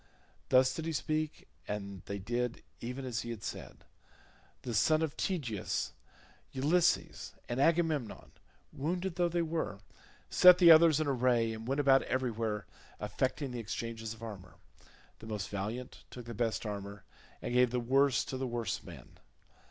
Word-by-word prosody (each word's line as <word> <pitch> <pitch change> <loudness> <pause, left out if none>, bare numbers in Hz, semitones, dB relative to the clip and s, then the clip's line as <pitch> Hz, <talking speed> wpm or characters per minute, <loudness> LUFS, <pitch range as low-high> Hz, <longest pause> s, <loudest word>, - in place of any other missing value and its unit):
Thus 130 0 +5
did 160 0 -4
he 165 - -2
speak, 155 0 -2 0.2
and 100 -2 -5
they 100 - -3
did 120 +4 -3 0.2
even 125 +3 -5
as 120 -3 -2
he 120 - -7
had 115 -3 -6
said. - - -7 0.8
The 120 - -4
son 155 +9 +3
of 155 -3 -2
Tydeus, 130 - -2 0.6
Ulysses, 165 +6 +1
and 120 +3 -1
Agamemnon, 160 -6 +1 0.4
wounded 175 +5 -2
though 175 -1 +2
they 170 0 0
were, 160 -11 -2 0.5
set 180 0 +8
the 175 -2 +8
others 160 -1 +7
in 155 - +1
array, 125 -4 +2
and 110 +1 -8
went 135 +2 0
about 135 -1 +5
everywhere 115 -5 -2 0.3
effecting 130 +1 -2
the 125 - -4
exchanges 115 0 -5
of 115 - -14
armour; 100 -5 -9 0.6
the 110 - -11
most 105 -3 -4
valiant 110 +6 -5
took 125 -2 -9
the 115 - -6
best 115 +1 -1
armour, 100 -1 -6 0.4
and - - -4
gave 125 0 +5
the 125 +1 -1
worse 135 +2 +3
to 130 - -4
the 130 0 -2
worse 120 -4 -2
man. - - -13
125 Hz, 160 wpm, -32 LUFS, 110-155 Hz, 0.8 s, set